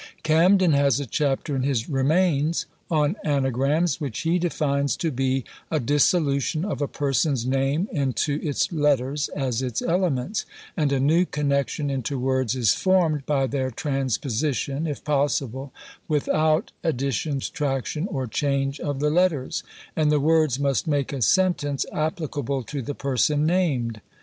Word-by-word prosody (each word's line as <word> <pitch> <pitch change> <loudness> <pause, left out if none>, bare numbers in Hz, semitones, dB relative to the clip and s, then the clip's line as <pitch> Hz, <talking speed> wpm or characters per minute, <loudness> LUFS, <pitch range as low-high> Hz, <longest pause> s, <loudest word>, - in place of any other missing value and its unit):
Camden 175 +3 +4
has 140 -2 +3
a 140 - -3
chapter 140 +2 -1
in 130 - 0
his 130 -4 0
"Remains" 155 +2 +1 0.2
on 155 +1 +2
ANAGRAMS, 140 +3 +1
which 135 -7 -3
he 170 +2 +1
defines 140 -5 0
to 165 - -1
be 130 0 0 0.3
a 155 - 0
dissolution 145 +3 +1
of 200 - -3
a 145 - +1
(person's) 140 -3 0
name 135 +7 0
into 145 -1 0
its 145 +2 -1
letters, 145 -2 +1
as 130 -4 -1
its 125 -3 -2
elements; 175 - 0 0.3
and 150 -5 +1
a 135 - +1
new 155 +6 +4
connexion 140 0 -1
into 135 +1 -2
words 130 -1 0
is 120 -6 +3
formed 170 -7 +1
by 140 -2 +2
their 130 -1 -1
transposition, 135 +2 -1
if 145 - -5
possible, 140 -2 -1 0.4
without 155 +1 +1
addition, 140 -1 -1
subtraction, 145 +5 -2
or 135 -7 -3
change 140 +3 -1
of 145 -2 -3
the 150 0 +2
letters: 165 -6 +1 0.3
and 155 -1 +2
the 150 - +3
words 155 -3 +2
must 140 +3 0
make 145 -1 0
a 135 - -4
sentence 145 - +2
applicable 155 -4 -2
to 140 +4 -5
the 140 +4 -5
person 145 +2 +1
named. 135 - 0
145 Hz, 145 wpm, -24 LUFS, 135-155 Hz, 0.4 s, Camden